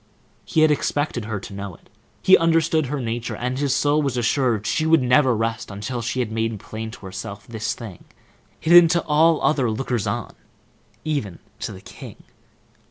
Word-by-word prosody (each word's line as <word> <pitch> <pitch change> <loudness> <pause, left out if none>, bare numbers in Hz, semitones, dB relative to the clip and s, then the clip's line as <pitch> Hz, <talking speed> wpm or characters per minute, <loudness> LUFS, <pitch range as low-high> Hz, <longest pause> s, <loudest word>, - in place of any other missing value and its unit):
He 160 - +1
had 155 -1 +5
expected 145 -5 -1
her 110 -2 -3
to 100 - -10
know 100 -2 -6
it. - - -23 0.4
He 185 - +8
understood 160 -2 +2
her 145 +2 -3
nature, 120 -1 -3
and 125 +2 -3
his 140 -2 +1
soul 145 +1 +2
was 135 -4 -1
assured 120 -2 +1
that - - -17
she 155 - 0
would 160 -4 +4
never 125 0 +4
rest 115 +1 -2
until 105 +5 -4
she 125 +2 -2
had 115 -3 -3
made 115 -1 -2
plain 110 +3 -7
to 110 - -12
herself 100 +1 -7
this 110 -2 -3
thing, 105 -8 -10 0.5
hidden 170 +1 +7
to 170 +1 +1
all 160 +1 +3
other 135 -6 +2
lookers 120 0 -2
on, - - -3 0.7
even 140 - -2 0.2
to - - -4
the - - -10
king. - - -12
125 Hz, 185 wpm, -22 LUFS, 110-150 Hz, 0.7 s, He